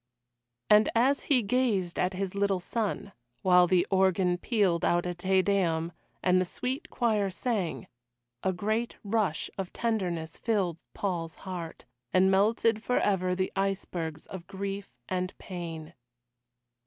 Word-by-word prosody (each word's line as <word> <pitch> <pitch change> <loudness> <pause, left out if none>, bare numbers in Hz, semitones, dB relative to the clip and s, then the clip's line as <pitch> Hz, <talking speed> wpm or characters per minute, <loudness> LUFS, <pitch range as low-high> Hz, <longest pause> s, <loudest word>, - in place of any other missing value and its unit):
And 210 +1 +6
as 265 +5 +3
he 255 -5 +3
gazed 200 -6 +1
at 180 +1 +1
his 190 0 -2
little 200 -1 +1
son, 200 +1 -3 0.3
while 180 -1 +6
the 180 0 +3
organ 190 -2 +3
pealed 195 -6 +1
out 175 0 +2
a 180 - -1
Te 185 +2 +2
Deum 170 -5 +1 0.3
and 185 0 +4
the - - +3
sweet 255 - -4
choir 215 -5 +1
sang, 195 -3 -2 0.6
a 190 - +1
great 215 +6 -1
rush 205 -6 0
of 190 -2 -3
tenderness 180 -9 -2
filled 190 -7 0
Paul's 170 -5 -2
heart, 175 -3 -6 0.3
and 190 +1 +4
melted 215 +3 +3
forever 190 -6 +1
the 185 0 -1
icebergs 185 -5 -2
of 180 -3 -9
grief 195 0 -5 0.2
and 185 0 -2
pain. 165 -3 -7
190 Hz, 135 wpm, -29 LUFS, 180-210 Hz, 0.6 s, And